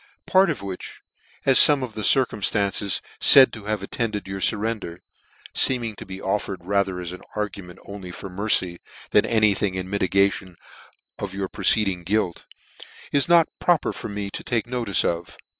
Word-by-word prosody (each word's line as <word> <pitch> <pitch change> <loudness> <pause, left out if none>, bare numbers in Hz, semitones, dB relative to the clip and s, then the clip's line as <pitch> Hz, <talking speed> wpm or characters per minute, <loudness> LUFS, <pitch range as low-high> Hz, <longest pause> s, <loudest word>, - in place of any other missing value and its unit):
tc - - -31
Part 190 +1 +4
of 95 - -4
which, 95 -2 -8 0.4
as 135 -1 +6
fome 145 -3 +6
of 120 -3 -6
the 110 - -5
circumftances 100 -5 +1 0.2
faid 135 -2 +8
to 105 -3 -9
have 105 -2 -2
attended 105 -1 -3
your 95 0 -5
furrender, 105 -4 -1 0.6
(feeming 120 -4 +1
to - - -10
be 95 0 -8
offered 95 -2 -3
rather 100 -1 0
as 90 0 -6 0.2
arguments 100 -4 -6
only 100 -2 -8
for 90 - -8
mercy, 95 -2 0 0.3
than - - +3
any 110 -3 +3
thing 95 -1 -2
in 95 0 -4
mitigation 100 -1 0 0.6
of - - -5
your 100 -1 -3
preceding 95 -1 +1
guilt) 95 0 -2 0.6
is 140 +2 +2
not 170 -1 +5
proper 175 -4 +1
for - - -7
me 100 -1 -5
to - - -6
take 120 -2 -1
notice 120 -5 0
of. 85 0 -3
100 Hz, 165 wpm, -23 LUFS, 95-110 Hz, 0.6 s, faid